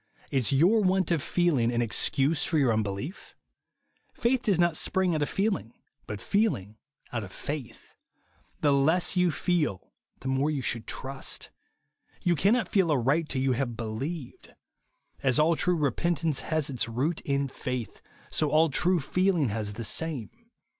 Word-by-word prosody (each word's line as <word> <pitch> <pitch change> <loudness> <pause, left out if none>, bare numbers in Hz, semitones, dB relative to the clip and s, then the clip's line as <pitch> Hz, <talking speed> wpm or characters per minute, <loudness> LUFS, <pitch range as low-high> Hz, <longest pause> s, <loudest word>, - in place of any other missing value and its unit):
Is 130 -3 +1
your 175 +11 +4
want 185 -2 +2
of 165 -4 +2
feeling 145 -11 +1
an 120 - -1
excuse 135 +6 +1
for 160 - 0
your 130 -6 +3
unbelief^ 110 - -4 0.8
Faith 245 +1 +1
does 205 -7 +1
not 175 -2 +2
spring 185 +2 +1
out 155 - -1
of 145 - 0
feeling, 195 - -1 0.3
but 105 -1 -5
feeling 155 - 0 0.4
out 115 -3 -2
of 95 - -9
faith. 135 0 -7 0.7
The 145 -2 +4
less 160 +8 +3
you 180 -1 +3
feel 155 - -1 0.3
the 130 - -6
more 135 +3 +1
you 145 -4 -2
should 115 -2 -2
trust. 135 0 -3 0.7
You 175 - +3
cannot 225 +8 +2
feel 190 -5 +2
aright 145 +4 +1
till 130 -1 -1
you 135 - +2
have 120 -2 -2
be 120 - -4
lieved. 130 +7 -6 0.7
As 130 -3 +2
all 160 +2 +4
true 180 +2 +1
repentance 155 +1 0
has 155 -3 -1
its 125 -4 -1
root 140 +9 -1
in 140 0 0
faith, 125 -4 -5 0.3
so 155 - +1
all 155 +1 +3
true 180 +5 +2
feeling 175 -1 +1
has 105 -1 -2
the 115 +3 -5
same. 145 0 0
145 Hz, 160 wpm, -28 LUFS, 125-175 Hz, 0.8 s, your